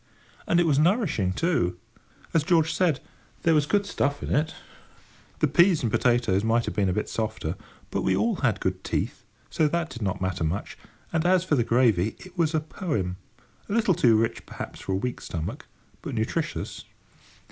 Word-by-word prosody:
And 170 - +3
it 175 - +4
was 145 -3 +3
nourishing, 165 - +2
too. 95 - 0 0.6
As 165 - +4
George 165 0 +3
said, 165 -7 +2 0.4
there 165 - +4
was 150 -1 +3
good 205 +3 +2
stuff 145 -7 -1
in - - -2
it. 155 +2 +1 0.9
The 155 - +5
peas 170 +3 +4
and 115 - 0
potatoes 120 -6 +2
might 115 +1 +2
have - - -3
been 100 -2 +1
a - - +1
bit 105 - -1
softer, 110 -7 -2 0.4
but - - -1
we 95 - +2
all 230 -4 +1
had 120 -7 +1
good 95 0 -2
teeth, - - -2 0.3
so 155 - +2
that 170 +1 -1
did 120 - -8
not 95 -3 -1
matter 95 -2 -2
much: 80 +5 -2 0.4
and 160 -1 +2
as 180 0 +4
for 185 - -1
the 125 -5 +4
gravy, 110 -5 +2
it 185 -1 -13
was 165 -3 +1
a - - +3
poem—a 120 - -6
little 215 -3 +3
too 115 -8 +4
rich, 115 +1 0
perhaps, - - -7
for 95 - -3
a - - +2
weak 125 +6 -3
stomach, 80 -2 -5 0.3
but - - -5
nutritious. - - -3
135 Hz, 190 wpm, -26 LUFS, 100-165 Hz, 0.9 s, The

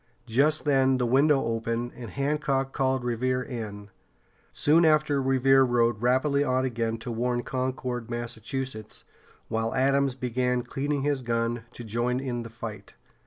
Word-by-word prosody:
Just 140 +8 +2
then 135 -2 +3
the 125 - 0
window 135 +3 +3
opened, 115 +1 -2
and 120 -3 -8
Hancock 140 -1 -1
called 130 -2 0
Revere 125 +1 0
in. 105 -5 -7 0.6
Soon 160 +3 +3
after 150 -3 +3
Revere 135 0 +4
rode 120 -3 +2
rapidly 130 +4 +2
on 130 -1 +1
again 115 -2 -1
to 115 +2 -6
warn 120 +1 -1
Concord, 130 -2 -3
Massachusetts, 120 -1 -5 0.4
while 115 0 -2
Adams 135 0 +2
began 125 -1 -1
cleaning 140 +1 -2
his 145 -2 0
gun 115 -1 -1
to 120 - -9
join 120 +3 -1
in 125 -3 -3
the 115 - -8
fight. 110 -1 -8
125 Hz, 145 wpm, -27 LUFS, 115-135 Hz, 0.6 s, Revere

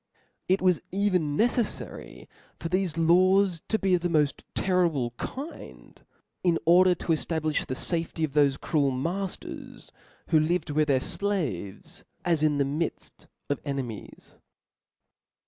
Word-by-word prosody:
It 185 +1 +2
was 180 -3 +3
even 180 -7 +1
neceflary 235 -1 -2 0.3
for 165 - -4
thefe 185 -2 0
la^s 180 +2 +4
to 220 - +1
be 195 -3 +1
of 180 - +3
the 175 - 0
mod 150 -4 +2 0.2
terrible 170 -10 +1
kind, 285 +5 -8 0.4
in 175 -2 +3
order 180 +2 +6
to - - -9
efta 160 +1 -1
blilh 155 -1 -1
the 130 - -3
fafety 165 +1 -1
of 150 - -8
thofe 140 -1 +3
cruel 145 -3 +1
matters, 175 +9 -5 0.4
who 160 - +5
lived 160 0 0
with 150 +1 +2
their 135 -2 +3
flaves 150 - -2 0.2
as 165 -3 +2
in 150 -2 +2
the 140 - +2
midtt 150 +5 -4 0.2
of 145 - -1
enemies. 135 -7 -6
165 Hz, 140 wpm, -27 LUFS, 145-185 Hz, 0.4 s, order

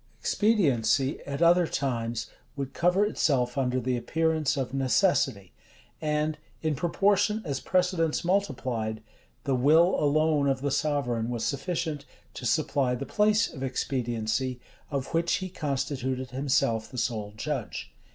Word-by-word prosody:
Expediency, 140 - +2
at 140 +4 -1
other 175 0 +5
times, 120 -5 -2 0.3
would 135 -1 -4
cover 180 +4 +3
itself 125 - +1
under 130 -2 0
the 125 +1 -1
appearance 160 +2 0
of 135 -1 -2
necessity; 135 - +1 0.5
and, 150 0 0 0.2
in 155 -1 +1
proportion 195 +7 +2
as 140 -4 -2
precedents 180 -4 +1
multiplied, 125 - -1 0.4
the 135 - 0
will 155 +8 +5
alone 150 0 +3
of 135 -1 0
the 140 0 -1
sovereign 130 -6 0
was 120 -2 -2
sufficient 155 -1 -2 0.3
to 125 - -4
supply 140 -3 +1
the 135 +3 -5
place 210 +4 +3
of 130 - -8
expediency, 125 -1 -2 0.3
of 140 -3 -3
which 170 +1 +1
he 185 -2 -4
constituted 130 -5 -3
himself 125 -4 0
the 125 - -9
sole 110 -3 -2
judge. - - -4
140 Hz, 130 wpm, -27 LUFS, 125-165 Hz, 0.5 s, other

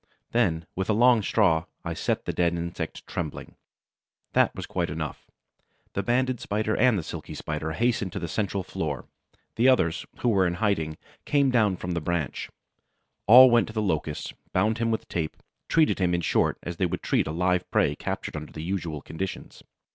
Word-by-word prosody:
Then, 85 -9 +1
with 95 +2 -2
a - - +4
long 120 +1 +5
straw, 95 -6 +2 0.2
I - - -2
set - - -1
the - - -2
dead 85 -1 +1
insect 85 0 -5
trembling. 80 -4 -5 0.8
That - - +3
was - - -5
quite - - -2
enough. - - -5 0.7
The 100 - 0
Banded 125 +3 +1
Spider 110 +1 -1
and 125 -4 +4
the 85 - -2
Silky - - -7
Spider 75 +1 -3
hastened 110 -3 0
to - - -4
the 85 - -3
central 100 +2 -2
floor, 75 -6 -4 0.5
the 120 +3 +4
others, 95 -11 +2
who 120 - +2
were 95 -5 +3
in 85 - -1
hiding, 90 -7 0 0.3
came 140 -2 +3
down 105 -6 +3
from 90 - -4
the 85 -1 -1
branch; 80 -4 -2 0.8
all 125 +4 +10
went 120 -1 +4
to 110 - -8
the 110 - -1
Locust, 80 -5 -2 0.2
bound 110 +1 +2
him 115 0 +1
with 110 -1 -2
tape, 80 -3 -3 0.3
treated 160 -8 +3
him, 90 -2 +2
in 85 - -1
short, 80 - +1
as 85 0 -5
they 90 - +1
would - - -4
treat - - +1
a - - -2
live 90 +2 0
prey 75 - +2
captured - - -4
under 75 0 -6
the 80 - -7
usual 85 -5 -3
conditions. 95 +4 -6
95 Hz, 190 wpm, -26 LUFS, 80-110 Hz, 0.8 s, all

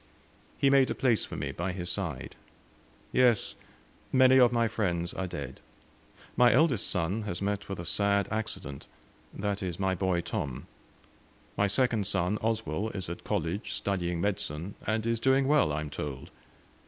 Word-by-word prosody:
He 140 -1 +3
made 135 -1 +5
a - - -1
place 120 -5 +2
for - - -8
me - - -3
by 90 +2 -3
his 90 -2 -5
side. 90 - -3 0.8
"Yes, 125 -4 +3 0.6
many 130 0 +6
of 125 -2 +6
my 115 -1 +2
friends 90 -6 -1
are 95 - -3
dead. 70 -7 -6 0.8
My 120 -1 +6
eldest 130 -6 +3
son 90 +4 0
has 90 - -3
met 100 0 -2
with 95 - -3
a 85 - -6
sad 100 +3 +1
accident 90 -10 -4 0.4
that 100 0 -3
is, 90 -2 -4
my 95 -1 +1
boy 95 -1 0
Tom; 75 - -4 0.9
my 100 - +2
second 110 -2 +2
son, 100 +1 +1
Oswell, 110 -3 -1
is 95 -4 -4
at 85 - -7
college 100 0 -2
studying 90 -3 -1
medicine, 95 -2 -2
and 110 +1 0
is 115 -1 +1
doing 135 +2 +3
well 145 - +4
I 75 +1 -1
am 75 -1 -6
told. 70 -1 -6
100 Hz, 165 wpm, -29 LUFS, 85-115 Hz, 0.9 s, many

